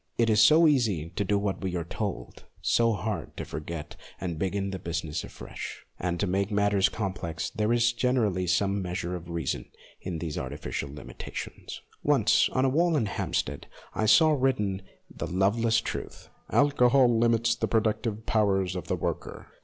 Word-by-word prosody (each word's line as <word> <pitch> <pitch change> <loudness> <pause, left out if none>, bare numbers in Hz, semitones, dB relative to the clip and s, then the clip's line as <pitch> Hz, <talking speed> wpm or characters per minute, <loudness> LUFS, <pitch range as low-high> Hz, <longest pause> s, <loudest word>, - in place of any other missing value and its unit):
It 115 -1 +3
is 105 0 +5
so 155 +8 +7
easy 105 - +1
to 100 - -1
do 100 +1 +1
what 100 -1 -2
we 95 -2 -2
are 85 - -1
told, 85 - -5
so 115 -1 +3
hard 105 +2 -4
to - - -4
forget 75 0 -6 0.2
and 85 -4 -4
begin 100 +1 -1
the 95 - -4
business 85 -2 -3
afresh. - - -8
And, 85 -1 -2
to - - +1
make 100 +1 0
the 105 - -2
matter 100 -1 +2
complex, 95 -6 -4
there 105 +1 0
is 120 0 +3
generally 115 -7 +1
some 100 +3 +1
measure 90 -1 -3
of 85 -1 -8
reason 85 -5 -3 0.3
in 90 -3 -4
these 80 -2 -4
artificial 70 +1 -4
limita 70 -4 -9
tions. - - -6 0.2
Once - - +4
on 130 - +1
a - - +4
wall 165 +3 +2
at 115 -7 +1
Hampstead - - -2 0.3
I 110 - 0
saw 155 +8 +6
written 115 -9 +1 0.3
the - - -6
loveless 110 +5 +2
truth, - - -6
" - - -36
Alcohol 125 -4 +4
limits 115 0 +3
the 115 - -2
productive 110 0 0
powers 95 -4 +1
of 90 - -5
the - - 0
worker." - - -4
100 Hz, 175 wpm, -28 LUFS, 90-115 Hz, 0.3 s, so